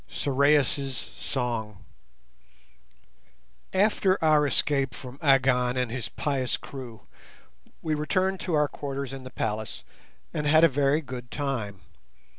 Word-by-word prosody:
SORAIS' 140 Hz, -1 st, +2 dB
SONG 110 Hz, -6 st, -4 dB, 1.9 s
After 195 Hz, -1 st, +3 dB
our 155 Hz, -2 st, +5 dB
escape 140 Hz, -2 st, +1 dB
from 130 Hz, +1 st, -10 dB
Agon 130 Hz, -3 st, +3 dB
and 125 Hz, -2 st, 0 dB
his 120 Hz, -2 st, -4 dB
pious 135 Hz, -4 st, -1 dB
crew 125 Hz, -5 st, -9 dB, 0.8 s
we 155 Hz, -, 0 dB
returned 185 Hz, +5 st, 0 dB
to 175 Hz, -, -1 dB
our 150 Hz, -1 st, +3 dB
quarters 140 Hz, -2 st, -5 dB
in 135 Hz, -1 st, -8 dB
the -, -, -7 dB
palace 110 Hz, -3 st, -3 dB, 0.5 s
and 150 Hz, -1 st, -1 dB
had 155 Hz, +2 st, +6 dB
a -, -, +9 dB
very 140 Hz, +1 st, +2 dB
good 125 Hz, -4 st, -8 dB
time. 115 Hz, -10 st, -3 dB
135 Hz, 120 wpm, -27 LUFS, 125-150 Hz, 1.9 s, a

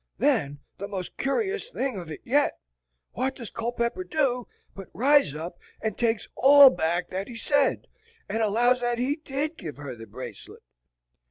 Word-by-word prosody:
Then 140 Hz, +1 st, +1 dB, 0.2 s
the 200 Hz, -, -4 dB
most 185 Hz, -3 st, -5 dB
cur'o's 415 Hz, -, -1 dB
thing 265 Hz, -, -2 dB
of 170 Hz, -3 st, -9 dB
it 155 Hz, -, -7 dB
yet, 285 Hz, +4 st, +2 dB, 0.5 s
what 265 Hz, +2 st, -2 dB
does 235 Hz, -5 st, -8 dB
Culpepper 235 Hz, +8 st, -2 dB
do 270 Hz, -8 st, 0 dB, 0.3 s
but 195 Hz, -1 st, -9 dB
rise 270 Hz, -, +4 dB
up 170 Hz, +3 st, -6 dB, 0.2 s
and 220 Hz, -2 st, -2 dB
takes 225 Hz, -2 st, 0 dB
all 280 Hz, 0 st, +9 dB
back 175 Hz, +1 st, -1 dB
that 190 Hz, +2 st, -3 dB
he 240 Hz, -, -9 dB
said, 285 Hz, +4 st, +1 dB, 0.4 s
and 225 Hz, -, -1 dB
allows 240 Hz, +4 st, +3 dB
that 240 Hz, 0 st, 0 dB
he 260 Hz, +4 st, 0 dB
DID 300 Hz, +1 st, -3 dB
give 155 Hz, -5 st, -7 dB
her 140 Hz, -4 st, -7 dB
the 115 Hz, -1 st, -11 dB
bracelet. 120 Hz, -1 st, -10 dB
235 Hz, 165 wpm, -26 LUFS, 180-275 Hz, 0.5 s, all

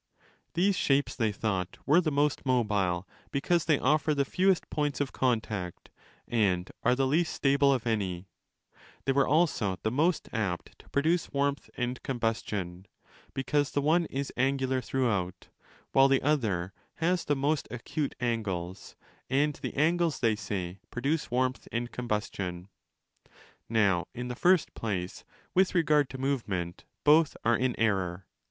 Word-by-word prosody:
These 190 Hz, +3 st, +3 dB
shapes, 140 Hz, -4 st, +1 dB
they 110 Hz, -3 st, +1 dB
thought, 95 Hz, -3 st, -2 dB
were 150 Hz, +7 st, +5 dB
the 165 Hz, -, 0 dB
most 145 Hz, 0 st, +1 dB
mobile 105 Hz, -8 st, +1 dB, 0.2 s
because 170 Hz, +4 st, +1 dB
they 155 Hz, -3 st, +4 dB
offer 150 Hz, +3 st, +2 dB
the 140 Hz, -1 st, +1 dB
fewest 185 Hz, +4 st, +2 dB
points 145 Hz, -2 st, -1 dB
of 145 Hz, -2 st, -1 dB
contact 110 Hz, -8 st, -2 dB, 0.4 s
and 95 Hz, -6 st, +1 dB
are 125 Hz, +1 st, +3 dB
the 135 Hz, +1 st, +1 dB
least 160 Hz, +5 st, +2 dB
stable 140 Hz, 0 st, +3 dB
of 130 Hz, -4 st, +1 dB
307* -, -, -6 dB
any; 95 Hz, -4 st, -2 dB, 0.8 s
they 135 Hz, -, +2 dB
were 135 Hz, 0 st, +3 dB
also 140 Hz, -, +2 dB
the 110 Hz, -, 0 dB
most 160 Hz, +7 st, +1 dB
apt 100 Hz, -7 st, -3 dB
to -, -, -18 dB
produce 160 Hz, +4 st, +1 dB
warmth 140 Hz, 0 st, -1 dB
and 125 Hz, 0 st, -2 dB
combustion, 105 Hz, -7 st, -3 dB, 0.5 s
because 145 Hz, +1 st, +1 dB
the 145 Hz, -, 0 dB
one 165 Hz, +3 st, +3 dB
is 140 Hz, -2 st, -4 dB
angular 130 Hz, 0 st, +1 dB
throughout 105 Hz, -9 st, -1 dB
ὅ -, -, -20 dB, 0.4 s
while 135 Hz, 0 st, +6 dB
the 135 Hz, -1 st, +2 dB
other 105 Hz, -11 st, 0 dB, 0.2 s
has 175 Hz, +2 st, +1 dB
the 145 Hz, -, +1 dB
most 145 Hz, +2 st, 0 dB
acute 135 Hz, +4 st, -3 dB
angles, 100 Hz, -7 st, -3 dB, 0.3 s
and 145 Hz, +3 st, +2 dB
the -, -, -5 dB
angles, 165 Hz, +1 st, +2 dB
they 115 Hz, -3 st, +2 dB
say, 95 Hz, -3 st, -4 dB
produce 140 Hz, +6 st, -1 dB
warmth 130 Hz, +1 st, 0 dB
and 120 Hz, +1 st, -2 dB
combustion. 100 Hz, -6 st, -3 dB, 1.0 s
Now, 100 Hz, -6 st, +2 dB
in 125 Hz, +1 st, -4 dB
the 125 Hz, -, -4 dB
first 180 Hz, +5 st, +3 dB
place, 95 Hz, -5 st, -4 dB, 0.3 s
with 190 Hz, 0 st, +3 dB
regard 150 Hz, -5 st, +3 dB
to 130 Hz, -, -7 dB
movement 105 Hz, -11 st, -2 dB, 0.2 s
both 155 Hz, 0 st, +5 dB
are 115 Hz, +1 st, +4 dB
in 125 Hz, 0 st, -1 dB
error. 95 Hz, -4 st, 0 dB
130 Hz, 150 wpm, -29 LUFS, 105-145 Hz, 1.0 s, while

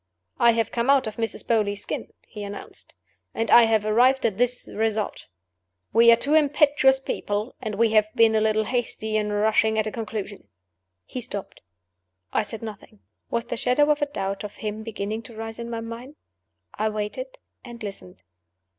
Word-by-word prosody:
"I 235 Hz, 0 st, +6 dB
have 225 Hz, 0 st, 0 dB
come 235 Hz, +2 st, -1 dB
out 275 Hz, -1 st, +5 dB
of 215 Hz, -1 st, -6 dB
Mrs. 225 Hz, -1 st, -3 dB
Beauly's 210 Hz, -3 st, +1 dB
skin," -, -, -5 dB
he 210 Hz, -2 st, -8 dB
announced. 205 Hz, 0 st, -8 dB, 0.4 s
"And 225 Hz, -1 st, -1 dB
I 235 Hz, -, +9 dB
have 220 Hz, -2 st, +2 dB
arrived 250 Hz, +5 st, +4 dB
at 215 Hz, -2 st, 0 dB
this 245 Hz, 0 st, +1 dB
result: 220 Hz, -1 st, -1 dB, 0.7 s
We 235 Hz, +2 st, +7 dB
are -, -, +8 dB
two 275 Hz, +6 st, -1 dB
impetuous 290 Hz, -3 st, +4 dB
people; 210 Hz, -3 st, -3 dB
and 215 Hz, -4 st, -3 dB
we 225 Hz, +1 st, +3 dB
have 215 Hz, -1 st, +4 dB
been 225 Hz, -1 st, +5 dB
a 220 Hz, -, +3 dB
little 220 Hz, 0 st, +2 dB
hasty 220 Hz, -2 st, -2 dB
in 210 Hz, -1 st, 0 dB
rushing 220 Hz, +1 st, +2 dB
at 215 Hz, -, +2 dB
a 215 Hz, -, -3 dB
conclusion." 210 Hz, -, -6 dB, 0.6 s
He 255 Hz, -, -6 dB
stopped. 205 Hz, -4 st, -7 dB, 0.7 s
I -, -, +3 dB
said 220 Hz, +1 st, -6 dB
nothing. 215 Hz, -1 st, -9 dB, 0.3 s
Was 235 Hz, 0 st, -1 dB
the 240 Hz, -, -4 dB
shadow 285 Hz, +6 st, +3 dB
of 295 Hz, -, 0 dB
a 290 Hz, -, +2 dB
doubt 195 Hz, -8 st, -4 dB
of 210 Hz, -, -6 dB
him 215 Hz, 0 st, -5 dB
beginning 220 Hz, 0 st, -4 dB
to 230 Hz, 0 st, -13 dB
rise 225 Hz, +1 st, -6 dB
in 235 Hz, 0 st, -5 dB
my 230 Hz, -1 st, -4 dB
mind? 235 Hz, +5 st, -8 dB, 0.6 s
I 215 Hz, +1 st, 0 dB
waited, 215 Hz, -, -5 dB, 0.3 s
and 240 Hz, -2 st, -10 dB
listened. 95 Hz, -, -7 dB
225 Hz, 180 wpm, -25 LUFS, 215-240 Hz, 0.7 s, I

